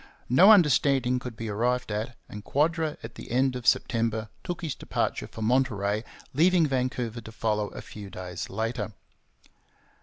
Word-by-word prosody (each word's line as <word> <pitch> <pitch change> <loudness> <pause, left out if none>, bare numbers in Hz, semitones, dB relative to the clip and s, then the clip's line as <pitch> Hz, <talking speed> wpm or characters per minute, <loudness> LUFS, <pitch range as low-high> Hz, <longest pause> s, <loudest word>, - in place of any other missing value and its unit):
No 180 - +8
understanding 140 - +4
could 125 -2 -7
be 115 +1 -5
arrived 120 +3 0
at, 110 +4 -3
and 105 0 -9
Quadra 160 +3 0
at 115 +1 -7
the - - -10
end 130 +2 +2
of 125 -1 -5
September 115 -2 +1
took 175 -1 -5
his 155 -5 -2
departure - - -2
for 110 - -7
Monterey, 110 -4 +1 0.3
leaving 170 +3 +4
Vancouver 125 -4 -2
to 110 - -10
follow 105 -2 -1
a - - -9
few 105 -2 -9
days 90 -1 -6
later. 110 +1 -3
120 Hz, 155 wpm, -27 LUFS, 110-135 Hz, 0.3 s, No